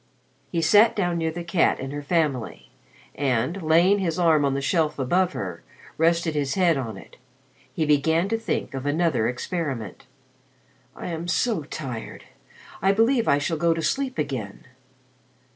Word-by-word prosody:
He 165 -2 0
sat 215 +5 +5
down 175 -4 0
near 160 0 0
the 170 +2 -5
cat 170 0 +1
and 135 +1 -5
her 145 - -4
family, 140 - -2 0.4
and, 135 +6 -1
laying 170 +5 +4
his 170 -4 -1
arm 165 -4 +3
on 135 -1 0
the - - 0
shelf 155 +1 0
above 175 +8 +1
her, 90 -4 -5 0.3
rested 165 0 +2
his 145 -2 -1
head 180 -4 +3
on 115 -7 -4
it. - - -14 0.5
He 155 +4 -1
began 160 +4 +2
to 225 - +1
think 225 - -3
of 135 +1 -4
another 150 -6 +1
experiment. 130 - -4 0.9
"I - - -6
am 165 0 -4
so 200 +1 +1
tired, 130 -7 -7 0.6
I 190 +2 +4
believe 230 +3 +2
I 140 - +4
shall 150 +3 -1
go 165 +1 +2
to 165 - -3
sleep 270 - -1
again. 130 -9 -4
160 Hz, 160 wpm, -24 LUFS, 135-175 Hz, 0.9 s, sat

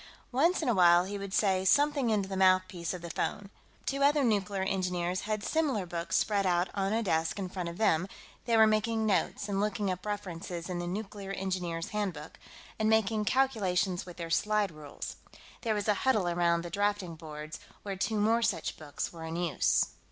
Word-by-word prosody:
Once 325 +7 +2
in - - -1
a 240 - +4
while, 175 -2 +6
he 200 +1 -5
would 200 -1 -6
say 190 -2 +2
something 285 +4 +3
into 205 -3 +1
the 195 - -4
mouthpiece 185 -2 +2
of 180 -2 -6
the 170 - -5
phone. 200 +5 -3 0.3
Two 275 0 -1
other 290 +1 +4
nuclear 205 -4 +1
engineers 180 -2 -1
had 215 -1 -1
similar 275 - 0
books 170 -1 -3
spread 205 -2 +1
out 180 -1 +1
on 195 0 -1
a 225 +1 +1
desk 160 -3 0
in 195 -2 -3
front 180 -2 -4
of 170 - -8
them; 185 -5 +2 0.4
they 230 -1 +3
were 220 - +8
making 220 +1 +1
notes 200 0 0
and 195 -1 -1
looking 205 -1 0
up 180 0 -5
references 180 -4 -5
in 175 - -2
the 175 - -3
Nuclear 195 +1 -5
Engineers' 180 -4 -3
Handbook, 185 -8 -4 0.4
and 215 0 +2
making 220 -1 +2
calculations 200 -8 +1
with 180 -2 -11
their 165 -1 -5
sliderules. 190 -8 -1 0.4
There 225 -3 0
was 205 0 -2
a 210 - +5
huddle 220 -9 +2
around 170 -1 +2
the 175 - -7
drafting 205 -2 0
boards, 155 -1 -8 0.2
where 200 -1 -4
two 210 +3 -1
more 225 +3 +3
such 190 -7 -1
books 150 +1 -5
were 165 -1 -8
in 160 0 -5
use. 170 -3 +2
195 Hz, 195 wpm, -30 LUFS, 175-215 Hz, 0.4 s, were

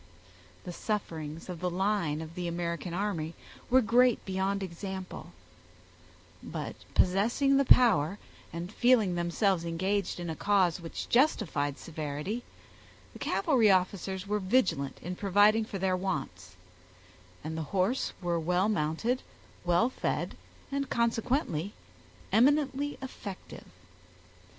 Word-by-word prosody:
The 180 - -6
sufferings 165 -7 -4
of 180 -3 -6
the 180 +1 -1
line 180 -4 0
of 160 +1 -10
the 180 0 -4
American 170 +1 -3
army 170 -4 -2 0.3
were 260 +1 +5
great 240 +2 +3
beyond 195 +1 -1
example; 190 +1 -6 1.1
but - - -5 0.2
possessing 235 +9 +3
the 275 - +3
power, 200 - +5 0.3
and 175 +4 -6
feeling 240 -7 +4
themselves 175 +1 +1
engaged 185 +4 -1
in 175 - -4
a 160 - -3
cause 190 -4 +2
which 165 - -6
justified 195 - +2
severity, 155 +7 -4 0.7
the - - -11
cavalry 250 -9 +3
officers 190 0 +1
were 210 +1 0
vigilant 185 - +1
in 180 +2 -4
providing 205 +3 +4
for 215 -3 -5
their 190 0 +1
wants, 140 - -4 0.9
and 160 +1 -4
the 160 - -2
horse 200 +7 +1
were 170 -1 0
well 180 +5 +1
mounted, 210 +7 0 0.4
well 175 +6 +3
fed, - - -2 0.4
and 275 0 -2
consequently 230 - 0 0.6
eminently 285 +2 +2
effective. 205 -7 -8
190 Hz, 120 wpm, -30 LUFS, 170-220 Hz, 1.1 s, were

